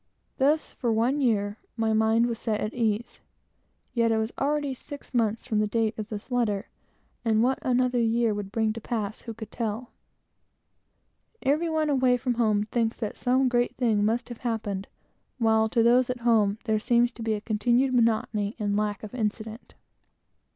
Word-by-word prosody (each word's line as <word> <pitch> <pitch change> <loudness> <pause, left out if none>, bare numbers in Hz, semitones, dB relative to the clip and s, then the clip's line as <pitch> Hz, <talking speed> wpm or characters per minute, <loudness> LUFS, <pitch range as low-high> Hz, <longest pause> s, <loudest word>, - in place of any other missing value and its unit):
Thus, 295 +4 +2
for 240 -3 -2
one 240 +6 +1
year, 205 -4 +1 0.2
my 225 -1 +1
mind 220 +2 +3
was 235 -1 -2
set 215 -2 -1
at 215 - -3
ease, 225 -1 -1 0.7
yet 230 -2 +2
it 225 - +2
was 220 +1 -1
already 290 0 0
six 285 +1 -11
months 225 -2 0
from 220 -4 0
the 210 - +2
date 225 0 0
of 215 -1 -6
the 210 -2 -6
letter, 215 -4 0 0.5
and 225 -1 +3
what 260 +2 +1
another 250 -1 +1
year 230 -1 +2
would 205 -1 -5
bring 220 0 +1
to 230 - -7
pass, 215 -2 -3
who 230 - -7
could 220 -1 -9
tell? 230 +1 -4 1.5
Every 305 +5 +2
one 310 -2 +1
away 255 -2 +3
from 245 0 -1
home 215 -3 +2
thinks 230 -2 0
that 220 -3 -4
some 255 +1 +2
great 245 -1 +1
thing 225 -5 +2
must 230 +4 0
have 240 - -8
happened, 210 -5 -3 0.5
while 220 -2 +3
to 230 +1 +2
those 245 +2 +4
at 250 -1 -3
home 220 -4 +3
there 220 -3 +1
seems 240 +2 +2
to 235 - -12
be 220 -1 0
a - - -3
continued 240 +5 +1
monotony 220 -3 +1
and 205 -2 -1
lack 210 0 -1
of 215 - -8
incident. 220 0 -4
230 Hz, 180 wpm, -27 LUFS, 215-245 Hz, 1.5 s, those